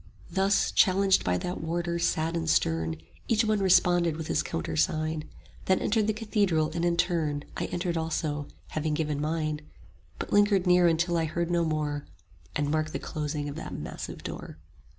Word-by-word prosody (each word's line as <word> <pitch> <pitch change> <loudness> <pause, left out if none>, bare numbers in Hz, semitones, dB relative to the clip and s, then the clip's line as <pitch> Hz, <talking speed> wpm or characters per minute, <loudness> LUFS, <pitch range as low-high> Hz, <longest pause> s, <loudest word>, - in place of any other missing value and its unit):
Thus, 195 +1 +2
challenged 195 -1 +4
by 90 0 +1
that 180 - -4
warder 170 +1 -2
sad 165 0 0
and 165 -1 -1
stern, 80 - +1 0.3
Each 225 0 +3
one 215 -1 +2
responded 175 -3 +4
with 160 -1 -5
his - - +2
countersign, 150 - -1 0.4
Then 185 - +3
entered 215 0 +1
the - - +3
cathedral; 205 -8 +1
and 170 - -2
in 170 -1 +2
turn 165 -5 +1 0.2
55 - - -3
I - - -3
entered 175 -1 -1
also, 155 -2 -2 0.2
having 155 -1 -1
given 150 -2 -1
mine; 155 -1 -1 0.6
But - - -5
lingered 205 -2 +4
near 180 -1 +5
until 170 +1 +2
I 165 - +1
heard 170 +2 -2
no 170 -1 +2
more, 150 -2 -2 0.5
And 145 0 0
marked 155 0 0
the - - -1
closing 150 -1 -3
of 145 - -5
the 160 - -6
massive - - -6
door. - - -7
165 Hz, 175 wpm, -28 LUFS, 150-180 Hz, 0.6 s, near